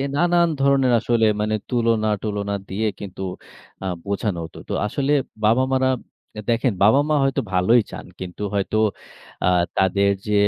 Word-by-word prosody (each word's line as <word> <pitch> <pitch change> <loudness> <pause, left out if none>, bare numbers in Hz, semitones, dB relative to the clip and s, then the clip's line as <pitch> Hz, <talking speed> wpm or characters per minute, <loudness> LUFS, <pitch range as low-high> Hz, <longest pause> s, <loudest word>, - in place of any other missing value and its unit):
নানান 175 +2 +3
ধরণের 135 -2 +3
আসলে 115 -1 +2 0.2
মানে 110 0 0
তুলনা-টুলনা 110 -4 0
দিয়ে 110 +3 -1
কিন্তু 95 -2 -8 0.6
আ - - -4 0.2
বোঝানো 100 -2 -2
হতো। 80 - -13
তো - - -2
আসলে 140 +6 -1 0.3
বাবা-মারা 130 +4 +3 0.6
দেখেন, 115 0 +2
বাবা-মা 145 +8 +4
হয়তো 135 0 +1
ভালোই 105 +7 +4
চান। - - -8
কিন্তু 95 +2 -7
হয়তো 100 +1 0 0.7
আ - - +3 0.3
তাদের 100 +1 +3 0.2
যে, 105 - 0
110 Hz, 130 wpm, -22 LUFS, 100-130 Hz, 0.7 s, বাবা-মা